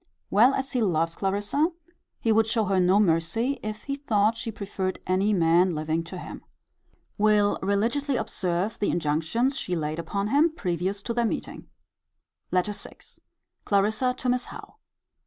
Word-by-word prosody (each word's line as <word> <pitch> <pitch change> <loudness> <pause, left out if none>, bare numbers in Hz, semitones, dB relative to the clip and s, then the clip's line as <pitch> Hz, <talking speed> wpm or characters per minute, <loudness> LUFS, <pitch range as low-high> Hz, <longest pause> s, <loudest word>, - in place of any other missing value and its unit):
Well 240 +7 +5
as 270 0 -3
he 250 - 0
loves 165 -5 +1
Clarissa, 205 - 0 0.5
he 225 - +1
would 220 0 +4
show 220 -1 +1
her 190 -1 +1
no 185 +3 +4
mercy, 205 +9 +1
if 215 0 -6
he 275 - -3
thought 220 -6 +1
she 225 0 -5
preferred 195 -2 -4
any 190 +3 +1
man 175 -1 +3
living 155 +2 -1
to 180 +2 -8
him. - - -8 0.8
Will 210 -1 +3
religiously 230 +9 0
observe 190 -2 -2
the 205 - +1
INJUNCTIONS 165 - 0
she 180 -9 -2
laid 155 0 -2
upon 200 +5 -2
him 310 +5 +3
previous 185 - -2
to 235 - -3
their 235 0 +1
meeting. - - -5 0.8
LETTER 185 +3 +1
VI. 205 - -10 0.7
Clarissa 220 +5 +1
to 255 - -5
Miss 250 0 +1
Howe. - - -11
205 Hz, 155 wpm, -26 LUFS, 180-230 Hz, 0.8 s, Well